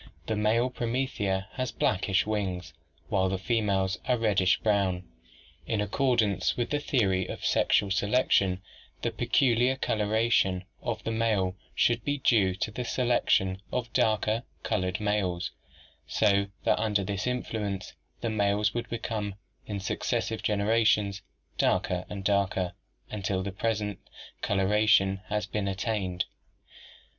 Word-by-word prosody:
The 110 - -1
male 115 +4 +2
promethea 115 -6 -1
has 130 -1 -3
blackish 95 +1 +1
wings 95 -5 -2 0.4
while 95 -1 +2
the 95 - -1
females 100 -2 0
are 125 - +3
reddish 100 -5 +3
brown. 100 -4 +1 0.6
In 110 - 0
accordance 105 -3 +1
with 120 - -1
the 145 - +1
theory 95 -10 +1
of - - -6
sexual 100 - +3
selection, 100 -3 +2 0.4
the - - 0
peculiar 125 0 +2
coloration 105 -5 +1 0.2
of 110 -2 -3
the 115 - -2
male 110 -5 +1 0.2
should 120 -1 +2
be 145 0 0
due 105 -8 +3
to 105 +3 -2
the 125 +4 -4
selection 115 -7 +1
of 120 -2 -3
darker 110 +1 +2 0.2
colored 90 0 -1
males, 100 -4 -1 0.6
so 100 +7 +2 0.2
that - - +2
under 105 -3 +1
this 100 +3 -3
influence 110 -6 -3 0.3
the 115 - -1
males 105 0 +1
would 120 - -3
become, 110 -4 -3 0.3
in 100 -2 -3
successive 110 +3 -2
genera 105 +2 +2
tions, 100 -2 +2 0.4
darker 90 0 +1
and 100 -1 -6
darker 95 -2 +1 0.4
until 95 -2 -1
the 100 - -3
present 105 0 -2 0.4
coloration 100 -1 +3
has 105 0 -1
been 105 -1 -2
attained. 95 -2 -1
105 Hz, 130 wpm, -28 LUFS, 95-115 Hz, 0.6 s, are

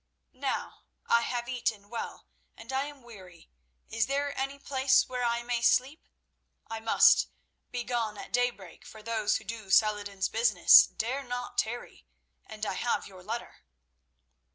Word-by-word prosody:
Now 265 +1 -4 0.2
I 235 - +3
have 240 0 -3
eaten 230 -5 -2
well, 230 +2 -6 0.3
and 230 +4 -9
I 270 +1 0
am 290 -3 -11
weary. 185 -8 -14 0.4
Is 225 0 +1
there 280 +1 -1
any 275 +1 -3
place 265 -1 +2
where 250 -1 -3
I 235 0 0
may 240 -1 -1
sleep? 260 +5 +1 0.6
I 225 0 -5
must 225 0 +5 0.4
be 245 -1 -4
gone 230 -4 -2
at - - -10
daybreak, 240 -7 -2
for 215 -1 -13
those 220 -2 0
who - - -12
do 215 -1 -7
Saladin's 205 -2 +2
business 220 -6 +6
dare 255 +5 -3
not 245 -1 -4
tarry, 240 +2 -4 0.4
and 215 0 -6
I - - -2
have 240 +6 -1
your 185 -2 -13
letter." 225 +6 -6
235 Hz, 155 wpm, -29 LUFS, 215-250 Hz, 0.6 s, business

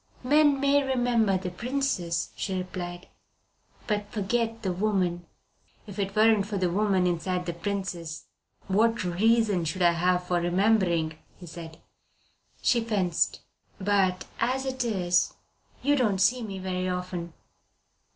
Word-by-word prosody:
"Men 290 +1 +4
may 280 +1 +3
remember 245 -7 +2
the 185 -1 -5
princess," 215 -6 -2
she 190 -2 -3
replied, 180 -1 -6 0.8
"but 205 -2 -2
forget 225 +2 -1
the 190 -2 0
woman." 180 -3 0 0.6
"If 205 -1 -9
it 195 0 -2
weren't 215 -2 +4
for 205 -1 -3
the 180 -2 0
woman 195 -1 +2
inside 180 +1 -1
the 170 - -3
princess; 175 -3 -4 0.4
what 225 +3 +2
reason 205 +1 +2
should 170 +3 -1
I 175 - +6
have 180 +1 +1
for 180 -1 0
remembering?" 175 -4 +1 0.2
he 180 - -11
asked. 165 -1 -9 0.9
She 240 - +3
fenced. 195 -7 0 0.4
"But, 190 -2 +1
as 260 +3 0
it 260 -1 -2
is, 180 -6 +1 0.5
you 290 +2 +3
don't 220 -8 +2
see 235 +7 +3
me 200 -4 -5
very 185 -1 -2
often." 180 -2 -4
190 Hz, 135 wpm, -27 LUFS, 180-225 Hz, 0.9 s, I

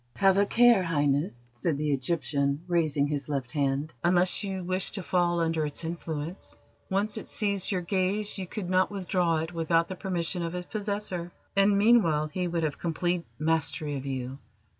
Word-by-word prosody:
"Have 195 +4 +4
a 200 - +3
care, 240 -3 +6
Highness," 145 -6 0
said 140 +5 -1
the 150 0 0
Egyptian, 140 0 0
raising 155 -5 +2
his 145 -1 -3
left 135 -4 -2
hand, 140 +1 -1
"unless 180 +3 +3
you 190 -2 -3
wish 185 +1 -1
to 195 - -2
fall 175 -1 +1
under 165 -1 +1
its 150 +2 -3
influence. 165 0 -5 0.3
Once 205 +3 0
it - - -10
seized 200 -2 0
your 185 -2 0
gaze 195 +3 0
you 185 - -4
could 195 -1 -5
not 185 +1 +3
withdraw 180 -4 0
it 165 +2 -5
without 165 0 +1
the 185 - -4
permission 180 -2 -2
of 170 +1 -3
its 180 0 -4
possessor, 200 -4 -3 0.2
and 200 +1 +4
meanwhile 200 -9 +4
he 180 +4 -2
would 170 -1 -1
have 150 -2 -2
complete 175 +1 -1
mastery 155 -1 0
of 135 0 -5
you. 130 0 -4
170 Hz, 180 wpm, -28 LUFS, 150-190 Hz, 0.3 s, care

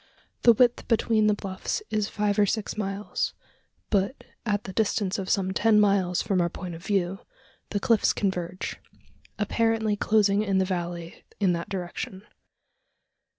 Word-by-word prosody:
The 235 - +7
width 245 +1 +2
between 220 -2 +3
the 210 - +3
bluffs 195 - -4
is 215 -1 0
five 210 -1 0
or 205 - +5
six 215 +1 -2
miles; 200 0 -2 0.6
but, 200 +6 0 0.2
at 205 -1 0
the 190 - -7
distance 205 -2 0
of 190 - -4
some 190 -2 +1
ten 215 +1 +4
miles 195 -4 +2
from 195 -4 +1
our 170 - +1
point 180 0 -7
of 165 +1 -9
view, 195 -2 0 0.5
the 205 - -1
cliffs 225 +1 +3
converge 180 -2 -2 0.6
apparently 220 0 +1
closing 205 -1 +3
in 200 -3 +1
the 190 - +3
valley 175 -2 -4 0.2
in 190 -4 +3
that 170 0 -4
direction. 185 +1 -5
200 Hz, 150 wpm, -26 LUFS, 185-215 Hz, 0.6 s, The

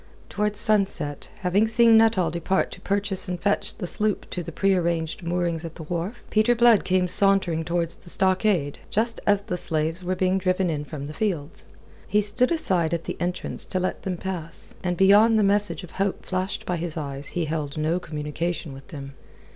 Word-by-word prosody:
Towards 210 0 -1
sunset, 195 -9 0
having 195 +4 +2
seen 230 0 +5
Nuttall 220 -7 +4
depart 170 +3 0
to 180 - -10
purchase 200 -1 -1
and 180 -1 -3
fetch 205 +2 0
the 200 - -4
sloop 210 +3 -1
to 180 - -3
the 170 - -7
prearranged 170 -3 0
moorings 170 -1 -1
at 165 -1 -7
the 165 - -8
wharf, 175 +8 -4
Peter 220 +3 +3
Blood 235 -2 +5
came 185 -1 +2
sauntering 185 -3 +3
towards 170 0 -2
the - - -15
stockade, 185 -6 +2
just 230 +2 0
as 205 -1 +3
the 185 -4 -3
slaves 160 +1 -1
were 185 +1 -1
being 185 +1 +1
driven 185 -1 +1
in 150 -1 -3
from 145 -2 -7
the 150 - -7
fields. 175 -3 -3 0.4
He 210 - +2
stood 220 +7 +2
aside 175 - +1
at 165 - -5
the - - -4
entrance 180 0 -3
to 185 - -1
let 185 - -2
them 185 -2 -3
pass, 170 -3 -5
and 180 -1 -1
beyond 210 +4 +6
the 215 - +3
message 205 0 +1
of 180 - -10
hope 195 0 -2
flashed 185 +2 -3
by 180 - -1
his 170 -1 -4
eyes, 140 -2 -4
he 170 - +1
held 155 -2 -3
no 160 +3 0
communication 155 0 -4
with 135 0 -12
them. 140 -2 -8
180 Hz, 195 wpm, -24 LUFS, 165-200 Hz, 0.4 s, beyond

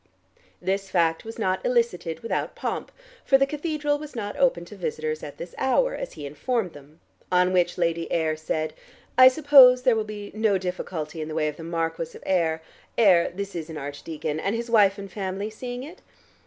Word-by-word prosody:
This 195 +1 -2
fact 165 -3 +1
was 225 0 -8
not 190 -4 0
elicited 230 -9 0
without 230 - -2
pomp, - - -4 0.3
for 270 - +5
the 275 - +3
cathedral 295 0 -1
was 300 -2 -9
not 205 -3 -4
open 255 -11 +2
to 210 - -11
visitors 155 -4 -3
at 145 - -8
this 170 0 -8
hour, - - +2
as - - -5
he 145 - -8
informed 185 - -2
them, 145 +3 -15 0.3
on 180 0 +3
which 175 -1 +2
Lady 170 -1 -1
Ayr 160 -2 +1
said, 155 0 -3 0.4
"I 255 +1 +9
suppose 260 -2 +7
there 250 -3 +4
will 220 - 0
be 210 -1 -8
no 215 -2 +2
difficulty 175 -4 -4
in 155 - -4
the 155 - -6
way 155 -1 +1
of 150 - -4
the 165 - -8
Marquis 165 0 -3
of - - -17
Ayr 165 -4 +1 0.3
Ayr, 185 -6 +5
this 200 +2 -6
is 165 -2 -5
an 160 - -6
archdeacon 150 +2 -5
and 200 +6 -1
his 235 0 -4
wife 200 -3 +5
and 195 -1 -8
family 200 +2 -4
seeing 245 +3 -6
it." 325 +7 -11
190 Hz, 195 wpm, -25 LUFS, 165-235 Hz, 0.4 s, I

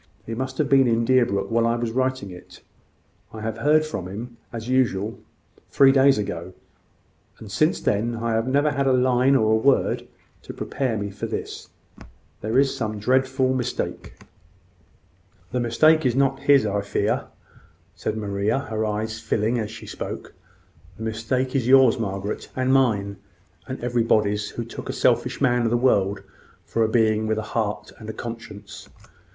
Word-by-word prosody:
He 115 - -5
must 130 +3 -4
have 150 - +1
been 135 -2 +5
in 115 0 +2
Deerbrook 115 -6 +2
while 115 0 +2
I 115 - +1
was 120 -1 -2
writing 130 -4 -1
it. 90 - -13 0.7
I 110 - -8
heard 140 +8 +2
from 100 - -5
him, 115 +5 -8
as 115 -1 -6
usual, 115 -5 0 0.5
three 135 -1 +6
days 135 -1 +5
ago; 95 -3 -4 0.8
and - - -11
since - - +2
then, 115 +4 0
I 115 0 -2
have 115 +2 0
never 145 +3 +2
had 140 -1 0
a 130 - +4
line 130 +1 +3
or 110 -4 +3
a - - +5
word 135 +4 +1 0.3
to - - -9
prepare 130 -5 -2
me 100 -1 -4
for 100 - -5
this. - - -6 0.7
There 110 +4 -1
is 135 0 +3
some 110 -3 -3
dreadful 130 +3 +1
mistake." 125 -1 -4 1.4
"The 125 - -1
mistake 155 +7 +4
is 125 -3 +1
not 135 0 +2
his, 140 -3 +4
I 100 -1 0
fear," 100 - -1 0.7
said 110 - -4
Maria, 100 +2 -1
her 115 -6 -3
eyes 110 +1 -2
filling 115 +3 0
as 105 -2 -3
she 110 - -10
spoke. - - -7 0.6
"The 110 - -7
mistake 115 +4 -2
is 125 -3 +1
yours, 130 -2 +6
Margaret, 100 -1 -4
and 130 0 +1
mine, 105 -7 +2 0.5
and 130 - -5
everybody's 110 -4 +1
who 120 - -5
took 115 - -8
a - - -2
selfish - - +1
man 125 -3 +2
of 115 - +1
the 120 - +2
world 100 -6 +1 0.4
for 115 - 0
a 110 - +1
being 110 -2 +2
with 110 0 0
a 110 - -2
heart 105 -3 -2
and 110 - -9
a - - -4
conscience." 110 -3 -9
115 Hz, 170 wpm, -23 LUFS, 110-130 Hz, 1.4 s, three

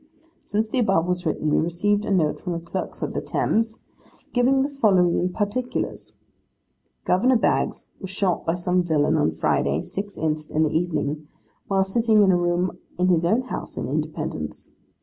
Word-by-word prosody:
'Since 215 +2 -1
the 255 - 0
above 195 -8 +2
was 180 -1 -1
written, 155 -1 -1
we - - +3
received 205 +5 0
a - - -4
note 160 -6 +2
from 180 - -3
the 170 - -3
clerk 185 +2 -4
of - - -3
the - - -2
Thames, 225 0 0 0.5
giving 265 +2 +3
the 280 - -1
following 185 -9 +2
particulars. 220 +6 -3 0.9
Gov. 240 +7 +3
Baggs - - 0
was 190 - -7
shot 190 -1 0
by 165 - 0
some 180 +1 +1
villain 155 -4 +2
on - - +2
Friday, 70 -2 +1
6th 200 - -5
inst., 155 -1 -2
in 155 - +1
the 155 0 0
evening, 155 -3 -1 0.4
while 195 -1 +2
sitting 215 +2 +3
in 190 - +5
a - - +4
room 175 +1 0 0.2
in 180 +1 +2
his 170 -1 +3
own 230 +7 +2
house 255 - -6
in - - -3
Independence. - - -4
180 Hz, 175 wpm, -24 LUFS, 170-210 Hz, 0.9 s, in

